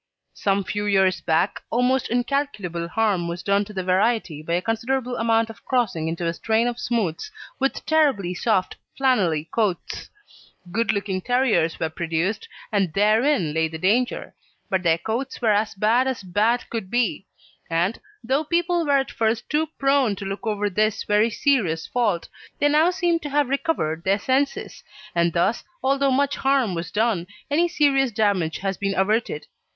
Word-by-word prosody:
Some 200 0 0
few 205 +2 -3
years 190 -2 +3
back, 165 +4 +1
almost 250 +2 +1
incalculable 240 - -1
harm 200 -4 0
was 170 +1 -5
done 200 0 +2
to 210 - -11
the 190 -2 -3
variety 190 -3 +1
by 170 +2 -3
a - - +2
considerable 245 +3 -1
amount 225 -1 +1
of 200 -2 -17
crossing 220 -11 0
into 165 +1 -3
a 165 - 0
strain 225 +6 +1
of 245 0 -3
smooths 230 - -2 0.3
with 270 0 -1
terribly 275 - +2
soft 185 0 0 0.2
flannelly 185 - +1
coats. 205 -7 -2 0.6
Good 230 +3 +1
looking 200 -2 -2
terriers 235 -9 +1
were 160 -1 -1
produced, 170 - -2 0.2
and 195 -5 +1
therein 215 - +2
lay 160 0 +1
the 160 0 -7
danger, 220 +9 0 0.4
but 190 -2 +1
their 165 -2 +3
coats 230 +9 -4
were 225 -3 +2
as 210 +1 0
bad 225 +6 +2
as 260 -6 -3
bad 210 +6 +1
could 225 -5 -4
be; 240 -4 0 0.4
and, 170 +6 0 0.2
though 265 +6 +1
people 345 +2 +1
were 285 -1 +4
at 270 0 -1
first 225 0 -1
too 310 +1 +1
prone 275 -6 +2
to 195 - -7
look 195 +4 -5
over 210 -1 0
this 215 +2 0
very 210 +2 +3
serious 220 - +1
fault, 210 -9 0 0.3
they 290 - +3
now 310 +4 +4
seem 350 -2 +1
to 300 - -6
have 285 -2 +1
recovered 260 - -1
their 195 +2 +2
senses, 265 +6 -1 0.3
and 170 -1 +1
thus, 185 +6 +1 0.2
although 275 +1 +2
much 280 +2 +1
harm 265 -7 +2
was 165 -1 -4
done, 210 -3 0 0.2
any 335 +4 +3
serious 280 -6 +2
damage 200 -7 +1
has 195 -1 -3
been 195 -1 -1
averted. 195 -4 0
215 Hz, 170 wpm, -23 LUFS, 185-260 Hz, 0.6 s, were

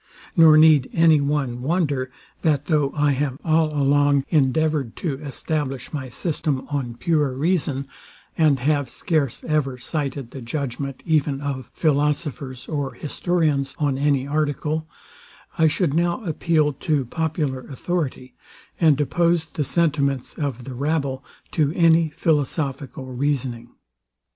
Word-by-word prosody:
Nor 160 -2 +7
need 155 -4 +6
any 160 -3 +5
one 140 -4 -1
wonder, 140 -3 0 0.3
that 150 -3 +1
though 150 -4 +1
I 145 -1 +3
have 135 -1 -1
all 160 -1 +3
along 145 -1 +3
endeavoured 150 -3 +1
to 145 -6 -3
establish 145 -2 -4
my 135 -3 -4
system 145 0 -2
on 130 -5 -2
pure 150 0 +1
reason, 140 -2 0 0.5
and 155 -4 +4
have 145 -1 +1
scarce 145 -5 -1
ever 145 -5 0
cited 140 -2 -3
the 135 - -8
judgment 135 +1 -4
even 150 -4 +1
of 140 -3 -4
philosophers 145 -4 -1
or 140 -5 -3
historians 150 -2 -1
on 140 -3 0
any 140 -2 +2
article, 150 +1 -1 0.7
I 160 - +6
should 155 -1 0
now 170 +6 0
appeal 155 -3 +1
to 140 0 -1
popular 155 -1 -2
authority, 135 -1 -4 0.5
and 155 -4 +4
oppose 170 +2 +2
the 155 -2 -3
sentiments 140 -4 0
of 135 -5 -4
the 130 - -7
rabble 140 -1 -1 0.3
to 150 -3 +1
any 165 -1 +4
philosophical 140 -4 -1
reasoning. 130 -2 -2
145 Hz, 130 wpm, -23 LUFS, 135-155 Hz, 0.7 s, Nor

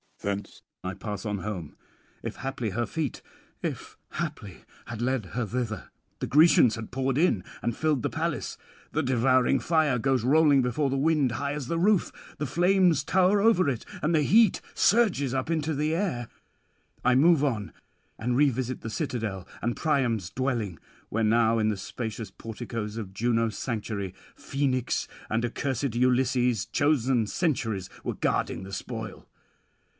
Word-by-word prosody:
Thence 100 0 -4 0.2
I 95 - -3
pass 105 +2 -6
on 105 -2 -2
home, 90 -7 -5 0.5
if - - -5
haply 130 -5 -3
her 120 +5 -1
feet 160 -5 -3 0.4
(if - - -5 0.2
haply!) 95 -3 -5 0.2
had 115 -1 -6
led 125 -5 0
her 125 - +1
thither. 115 -4 -3 0.3
The - - -2
Grecians 150 -6 +6
had 115 -1 -7
poured 130 +1 0
in, 150 - +2 0.2
and 120 0 -1
filled 155 -4 +1
the - - +1
palace. - - -3 0.3
The 155 - 0
devouring 130 0 +3
fire 155 -6 +2
goes 130 -1 +1
rolling 145 0 +5
before 130 +4 0
the 135 - 0
wind 145 -3 +2
high 140 +2 -2
as 145 -4 -4
the 165 - -1
roof; 200 +1 +3 0.3
the 150 - -1
flames 175 -2 +3
tower 190 +4 +3
over 190 -7 +4
it, 125 -4 -2 0.2
and 155 +3 +2
the 155 - +4
heat 215 +7 +4
surges 190 - +3
up 130 +4 -1
into 160 -1 0
the 150 +2 0
air. 155 - -2 0.7
I 125 - +4
move 155 +2 +5
on, 115 -8 -1 0.5
and 120 +2 -1
revisit 130 -2 +1
the 110 - -5
citadel 110 - -3
and 120 0 -1
Priam's 120 - 0
dwelling; 120 -9 -2 0.3
where 115 +1 0
now 115 +1 +3
in 110 0 +2
the 105 - -1
spacious 110 +1 -5
porticoes 115 0 -6
of 100 -4 -6
Juno's 115 0 0
sanctuary, 105 -5 -3 0.2
Phoenix 130 -3 -1 0.2
and 115 +2 0
accursed 130 0 -2
Ulysses, 125 -2 +2
chosen 135 -5 +2
sentries, 110 - -1
were - - -3
guarding - - -1
the 95 +1 -9
spoil. - - -6
125 Hz, 155 wpm, -27 LUFS, 110-150 Hz, 0.7 s, Grecians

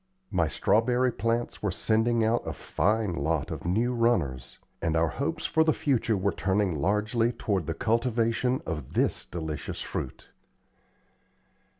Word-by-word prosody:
My 85 -4 +2
strawberry 120 +10 +2
plants 115 +3 -1
were 105 - 0
sending 110 +4 +1
out 115 +2 +2
a - - -4
fine 105 -3 0
lot 80 -2 -1
of - - -5
new 115 +7 +1
runners, 85 - 0 0.2
and 80 -1 0
our 80 0 +2
hopes 145 - -3
for 160 - +3
the 160 -1 +3
future 115 -6 +1
were 100 +1 +1
turning 95 -1 0
largely 105 +9 +1
toward 100 -8 -2
the 80 - -2
cultivation 115 +3 +1
of 75 -6 -5
this - - +1
delicious 80 -3 -5
fruit. - - -5
110 Hz, 140 wpm, -28 LUFS, 85-120 Hz, 0.2 s, for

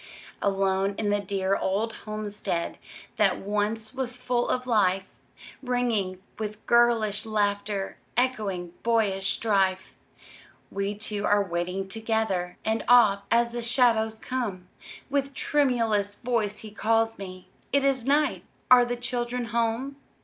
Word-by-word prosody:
Alone 195 0 +1
in 210 -2 0
the 205 - +2
dear 195 -1 0
old 210 +5 -1
homestead 210 -5 -3 0.4
That 210 -3 +3
once 210 +3 -1
was 255 -1 -3
full 245 -1 -1
of 255 0 0
life, 195 -6 +2 0.6
Ringing 235 -8 -1 0.2
with 215 0 -5
girlish 230 -3 +3
laughter, 205 -2 -1 0.2
Echoing 200 -9 -1
boyish 210 -5 +1
strife, 195 -4 +1 0.8
We 200 +1 -2
two 210 -1 -2
are 205 0 +4
waiting 180 +1 -3
together; 220 -4 -1
And 220 +1 0
oft, 210 -5 +6
as 235 0 +3
the 240 0 -4
shadows 230 -2 +3
come, 215 -8 -4 0.4
With 275 -1 -1
tremulous 230 -8 +1
voice 225 -4 -1
he 215 - -9
calls 225 +1 +1
me, 185 -2 -9 0.2
"It 280 0 +3
is 270 -3 +2
night! 290 +4 +2 0.3
are 250 -1 +8
the 245 0 -2
children 245 0 -3
home?" 235 +4 -1
220 Hz, 130 wpm, -26 LUFS, 200-240 Hz, 0.8 s, are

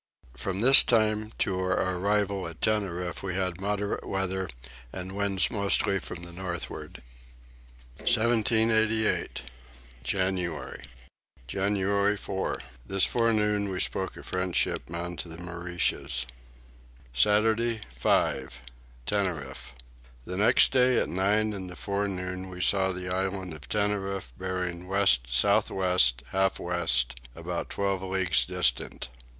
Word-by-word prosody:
From 95 +10 -3
this 130 +3 +10
time 110 -2 +1
to 95 -2 -1
our 95 0 0
arrival 100 0 0
at 85 -1 -10
Tenerife 90 -5 -1
we 95 -2 -4
had 90 -1 -2
moderate 105 0 -2
weather 95 -1 -2 0.4
and 95 +1 -6
winds 100 -1 +1
mostly 100 -2 +2
from 85 -1 -8
the 85 - -4
northward. 90 -1 -6 1.0
1788. 110 - +2 0.6
January. 85 -3 -2 0.6
January 100 +5 +1
4. 95 -1 -3 0.2
This 95 +6 +3
forenoon 105 -3 +1
we 95 -1 -3
spoke 95 0 -2
a - - -10
French 90 -1 -3
ship - - 0
bound 85 +1 -5
to 85 - -6
the 80 - -8
Mauritius. 85 -6 -2 0.9
Saturday 110 - +2
5. 65 +1 0 0.5
Tenerife. 80 -11 -3 0.5
The 90 - -5
next 105 - +5
day 130 -1 +4
at - - +1
nine 105 +4 +1
in 95 -2 -5
the 90 - -8
forenoon 95 -2 -3
we 90 -1 -9
saw 95 +1 +3
the 90 0 -4
island 95 -1 -3
of 75 -2 -11
Tenerife 100 -8 -1
bearing 90 +1 -4
west 95 -11 +3
south 60 - +3
west 90 -10 +2
half 95 0 +1
west 65 -9 +1 0.2
about - - -5
twelve 100 -1 -1
leagues 95 -3 +1
distant. 65 +1 0
95 Hz, 120 wpm, -27 LUFS, 90-100 Hz, 1.0 s, this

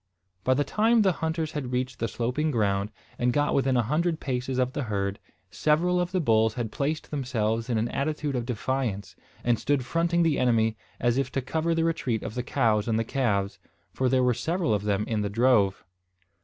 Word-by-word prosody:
By 130 - +3
the 145 - +2
time 220 +6 +3
the 190 - +4
hunters 160 -1 -1
had 135 -5 -4
reached 125 0 -2
the 115 - 0
sloping 125 +8 -1
ground, 100 -5 0 0.3
and 125 0 +2
got 145 +3 +1
within 135 -2 +2
a 120 - +3
hundred 160 +7 0
paces 130 -1 -2
of 130 0 +1
the 145 -3 -2
herd, 100 -2 -2 0.3
several 175 +4 +2
of 175 0 -2
the 185 - +1
bulls 110 -7 +2
had 115 -3 -3
placed 150 +3 -2
themselves 115 -5 -1
in 120 - +1
an 110 +2 0
attitude 150 0 -2
of 120 -1 -2
defiance, 125 -4 -2 0.3
and 120 -2 +2
stood 140 -3 0
fronting 170 +3 +1
the 160 -3 +2
enemy, 115 -3 +2 0.2
as 120 +2 +2
if 135 - -1
to 135 - 0
cover 160 +5 0
the 165 - +1
retreat 135 -9 -1
of - - -5
the 125 - -2
cows 115 -5 +1
and 115 0 0
calves, 100 -7 0 0.3
for 130 -1 +1
there 130 0 +3
were 125 -1 +3
several 160 +2 0
of 105 -1 -1
them 105 0 +1
in 110 -2 -1
the 100 - -1
drove. 105 -3 +3
125 Hz, 205 wpm, -27 LUFS, 115-150 Hz, 0.3 s, the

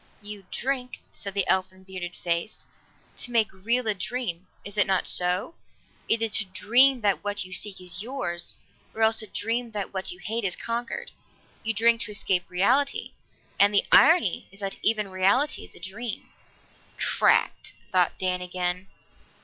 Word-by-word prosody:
"You 205 -2 -9
drink," 255 -1 -3
said 200 -1 -5
the 195 -2 +1
elfin, 185 0 0
bearded 185 -2 -7
face, 170 +4 -2 0.5
"to - - -1
make 225 -3 +1
real 230 +6 0
a 215 - +2
dream. 190 -3 -3 0.2
Is 205 0 -5
it 205 - +5
not 190 -2 +1
so? 180 - +1 0.5
Either 225 0 +2
to 210 0 +1
dream 240 +8 +4
that 200 -2 +1
what 205 -1 -1
you 185 - -9
seek 200 0 0
is 180 0 -3
yours, 215 -8 -2 0.4
or 225 - +1
else 220 0 +4
to 215 - -2
dream 230 +4 -2
that 205 -2 -4
what 190 -1 -2
you 180 - -9
hate 225 +5 -3
is 185 -3 -1
conquered. 240 - -4 0.5
You 225 0 0
drink 230 +2 +4
to - - -3
escape 190 -3 0
reality, 255 +11 +1 0.5
and 205 +1 +5
the - - +4
irony 325 - +5
is 195 +1 -15
that 195 -1 -2
even 215 -2 +2
reality 195 +10 +2
is - - -15
a - - -9
dream." 210 +6 -6 0.7
"Cracked!" - - +2 0.2
thought 180 -3 +2
Dan 185 -1 0
again. 180 +1 -2
205 Hz, 165 wpm, -26 LUFS, 185-230 Hz, 0.7 s, it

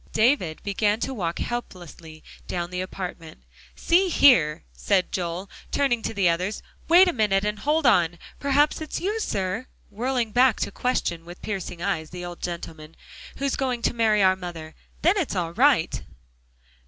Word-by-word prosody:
David 220 - +2
began 205 +1 0
to 270 - -2
walk 175 -8 -3
helplessly 175 -9 -7 0.2
down 175 0 -3
the 180 0 -3
apartment. 175 - -7 0.3
"See 370 +3 +2
here!" 170 - +5
said 60 - 0
Joel, 180 +1 -3 0.2
turning 265 -5 +1
to - - -3
the 195 -3 +3
others, 180 +5 -1 0.2
"wait 355 +3 +7
a 355 - +1
minute, 205 -4 +1
and 210 0 -2
hold 300 +6 +1
on. 175 -8 +4 0.2
Perhaps 285 +3 +2
it's 310 - -4
you, 415 +5 -1
sir," 200 - -2 0.2
whirling 240 +1 -1
back 245 0 +4
to - - -1
question, 180 -9 -1
with 175 +1 -12
piercing 180 -4 -5
eyes, 160 -2 -2
the 180 0 -7
old 175 0 -8
gentleman, 165 -2 -7 0.4
"who's 275 -1 -1
going 250 -3 -2
to - - +1
marry 220 -3 +3
our 185 0 +5
mother. 170 -4 -8 0.3
Then 350 +6 +4
it's 315 - -2
all 170 -2 -2
right!" 255 - +3
200 Hz, 165 wpm, -25 LUFS, 175-255 Hz, 0.4 s, wait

